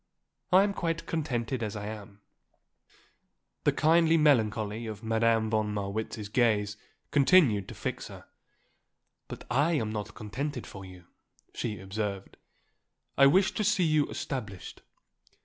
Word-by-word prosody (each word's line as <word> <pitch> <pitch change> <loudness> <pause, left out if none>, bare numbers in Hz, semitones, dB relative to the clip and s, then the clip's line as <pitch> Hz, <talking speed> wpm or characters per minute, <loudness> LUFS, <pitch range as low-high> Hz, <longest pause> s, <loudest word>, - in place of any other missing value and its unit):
I 185 +2 +7
am 200 0 0
quite 165 -3 -2
contented 130 -6 -2
as 105 -2 -3
I 105 -1 -5
am." 105 -1 -9 1.4
The - - +5
kindly 165 +1 +4
melancholy 110 -6 +2
of 105 -1 -7
Madame 115 0 +1
von 110 -1 0
Marwitz's 105 +1 -4
gaze 105 -2 +1 0.4
continued 140 - +4
to - - -9
fix - - -4
her. - - -12 1.0
"But - - -8
I 145 +7 +2
am 110 -9 -1
not 105 -1 -5
contented 125 +4 -5
for 95 - -10
you," 90 -2 -13 0.5
she 105 -3 -4
observed. 100 0 -5 0.8
"I 140 - +7
wish 190 +8 +4
to 215 - -2
see 205 -2 +2
you 155 -3 +2
established. 110 -9 -6
115 Hz, 130 wpm, -29 LUFS, 105-150 Hz, 1.4 s, I